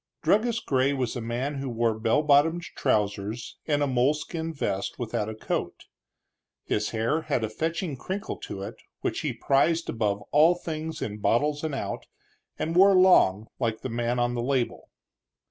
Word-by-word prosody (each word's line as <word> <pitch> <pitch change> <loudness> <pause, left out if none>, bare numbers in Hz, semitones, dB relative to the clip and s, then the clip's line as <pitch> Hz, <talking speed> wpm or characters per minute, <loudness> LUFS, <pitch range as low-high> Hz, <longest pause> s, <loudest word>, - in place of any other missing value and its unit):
Druggist 230 +2 +2
Gray 135 +1 +2
was 130 -3 -2
a 120 - -3
man 125 +5 -3
who 135 -1 -3
wore 115 -1 +1
bell 115 +7 +2
bottomed 155 +4 +4
trousers 105 +2 -1
and 145 -2 +2
a - - +3
moleskin 150 +5 0
vest 100 -10 -3
without 115 -3 -2
a 110 - -6
coat. - - -3 0.8
His 105 0 -1
hair 115 +8 0
had 120 - -1
a 110 - -1
fetching 160 - -2
crinkle 195 +10 -5
to 95 - -7
it, 100 - -7 0.2
which - - -1
he - - -1
prized 160 +5 +1
above 105 -3 -1
all 160 +4 +6
things 160 -2 -5
in 105 -1 -5
bottles 145 +8 +1
and 155 -3 -2
out, - - -4 0.5
and 165 +1 -2
wore 195 +2 +7
long, 110 - +5
like 115 -2 -1
the 130 - -4
man 120 +1 -1
on 120 0 +1
the 120 - -2
label. 130 -1 -1
130 Hz, 170 wpm, -27 LUFS, 115-160 Hz, 0.8 s, wore